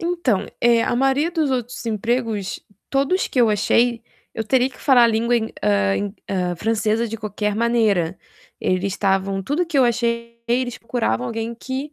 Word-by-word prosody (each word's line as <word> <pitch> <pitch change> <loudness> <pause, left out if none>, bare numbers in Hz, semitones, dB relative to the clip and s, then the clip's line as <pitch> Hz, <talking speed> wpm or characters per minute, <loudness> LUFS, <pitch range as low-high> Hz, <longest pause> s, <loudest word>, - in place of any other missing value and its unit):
Então, 335 - 0
eh, 235 -1 +4
a 240 - 0
maioria 270 +5 +2
dos 320 -5 0
outros 245 -1 -3
empregos, 225 -2 -1 0.3
todos 280 +8 +1
que 255 - 0
eu 235 - +5
achei, 230 +3 +2 0.3
eu 225 - -2
teria 255 +3 +2
que 260 - -17
falar 255 -4 +5
a - - +7
língua 230 +2 +2
em, 225 -1 -2
hã, 100 -1 +2
em, 100 0 -3
hã, 180 -2 -1
francesa 220 +2 0
de 225 - -5
qualquer 210 -1 -3
maneira. 215 -7 +1 0.4
Eles 185 0 0
estavam 195 -1 0
tudo 305 - -1
que 315 -4 0
eu 260 - +6
achei 235 -1 -1
eles 245 0 0
procuravam 225 - -1
alguém 225 - -4
que 265 +5 -5
235 Hz, 175 wpm, -21 LUFS, 205-255 Hz, 0.4 s, a